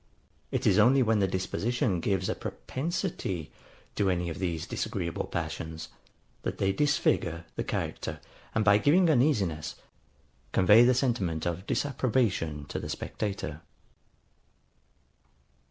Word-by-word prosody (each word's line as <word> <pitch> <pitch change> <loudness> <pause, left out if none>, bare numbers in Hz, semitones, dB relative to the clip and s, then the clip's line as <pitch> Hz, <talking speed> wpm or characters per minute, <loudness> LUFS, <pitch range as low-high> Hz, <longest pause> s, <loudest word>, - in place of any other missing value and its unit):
It - - -2
is 95 - +5
only 130 +5 +6
when 110 -2 +2
the 95 - +3
disposition 95 +2 -1
gives 95 +1 0
a - - 0
PROPENSITY 130 - -4 0.4
to 100 -2 +1
any 90 -1 0
of 80 - -7
these 85 -4 -2
disagreeable 85 -1 -3
passions, 80 0 -4 0.5
that - - -3
they 95 - +2
disfigure 90 - +1
the - - -2
character, - - -3 0.4
and 110 -2 +2
by 100 0 +6
giving 165 - +4
uneasiness, 110 - +1 0.8
convey 105 +5 +7
the 125 0 +4
sentiment 105 - 0
of 85 +3 -3
disapprobation 115 - 0
to - - -3
the - - -6
spectator. 95 -7 -4
100 Hz, 120 wpm, -29 LUFS, 85-120 Hz, 0.8 s, convey